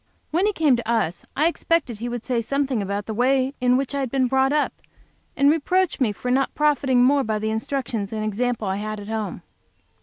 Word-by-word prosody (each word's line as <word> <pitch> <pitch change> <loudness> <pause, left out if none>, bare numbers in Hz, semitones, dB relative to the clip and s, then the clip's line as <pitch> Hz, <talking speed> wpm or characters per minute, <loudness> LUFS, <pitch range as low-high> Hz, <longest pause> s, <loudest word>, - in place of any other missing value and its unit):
When 355 +6 +2
he - - +2
came 305 -7 +3
to 235 -1 -3
us 185 -7 -1
I 300 - +3
expected 330 -8 0
he 240 +2 -3
would 240 -1 -5
say 245 -3 0
something 270 -1 -1
about 200 +1 -3
the 220 - -4
way 260 +3 +2
in 250 0 +4
which 275 +1 -2
I 280 - -1
had 265 -2 -1
been 265 +1 +1
brought 265 +1 +2
up, 300 0 +1 0.6
and 280 - +4
reproach 360 +3 +1
me 245 -6 +2
for 250 +5 -4
not 265 +1 +1
profiting 275 -4 +3
more 275 +2 +4
by 215 -2 -1
the 220 +1 -2
instructions 225 -2 -3
and 215 -1 -3
example 225 0 -1
I 190 0 -1
had 215 +1 -4
at 205 +1 -9
home. 210 -6 -4
250 Hz, 220 wpm, -23 LUFS, 220-275 Hz, 0.6 s, in